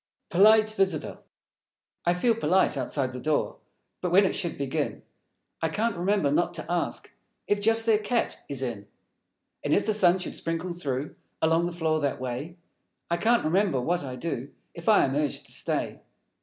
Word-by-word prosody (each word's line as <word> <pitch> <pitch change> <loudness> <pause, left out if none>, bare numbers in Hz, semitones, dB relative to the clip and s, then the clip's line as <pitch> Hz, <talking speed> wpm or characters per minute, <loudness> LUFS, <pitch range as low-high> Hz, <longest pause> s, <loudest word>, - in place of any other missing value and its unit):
Polite 215 +3 +6
Visitor 190 -7 -1 0.9
I 175 - +4
feel 230 +6 +3
polite, 190 -4 +2
outside 130 -3 -1
the 125 - -5
door; 155 +1 0 0.4
But 180 - -1
when 195 +3 +6
it - - +1
should 175 -4 -2
begin, 140 -2 -2 0.6
I 160 - +1
can't 220 +7 0
remember 180 -4 +1
Not 175 +3 +1
to 155 - -5
ask 175 0 -2 0.3
If 205 0 +1
just 225 +1 +2
their 220 -2 +4
Cat 230 +2 -1
is 135 -2 -3
in. 110 -5 -4 0.8
And - - +2
if - - +1
the 215 - +1
Sun 185 -3 +4
should 185 - -5
sprinkle 165 +2 -3
through 145 -4 -3 0.3
Along 165 +2 +2
the - - -4
floor 160 -2 0
that 140 -2 -1
way, 130 +7 -5 0.5
I 170 - +2
can't 230 +6 +2
remember 180 -3 +2
what 170 +6 0
I 130 -2 -5
do 135 -1 -4 0.2
If 170 +5 -3
I 215 - +6
am 135 - -2
Urged 145 -1 -1
to - - -9
Stay. - - -2
170 Hz, 180 wpm, -27 LUFS, 145-200 Hz, 0.9 s, Polite